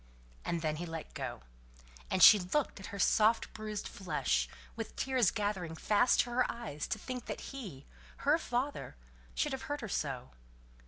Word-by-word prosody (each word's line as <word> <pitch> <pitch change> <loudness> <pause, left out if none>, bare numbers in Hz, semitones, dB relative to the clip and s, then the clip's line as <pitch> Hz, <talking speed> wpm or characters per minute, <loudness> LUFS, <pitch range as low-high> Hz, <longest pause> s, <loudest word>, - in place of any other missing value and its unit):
And 170 -1 -2
then 155 -1 0
he 175 +2 -4
let 165 -1 -6
go; - - -5 0.7
and 185 - +3
she 210 - +11
looked 200 +8 -1
at 195 - -7
her 200 - -6
soft 220 +3 +3
bruised 215 -1 -4
flesh, 150 - 0 0.3
with - - -6
tears 255 -6 +3
gathering 200 -6 -2
fast 210 +8 +4
to 240 - -5
her 250 +1 +2
eyes 220 -11 -5
to - - -1
think 250 +3 -6
that - - -5
he, 190 - -7 0.4
her 300 +3 +5
father, 265 0 -2 0.4
should 300 - +1
have 265 0 -3
hurt 290 0 -2
her 225 - -4
so. 135 - -3
210 Hz, 170 wpm, -33 LUFS, 165-245 Hz, 0.7 s, she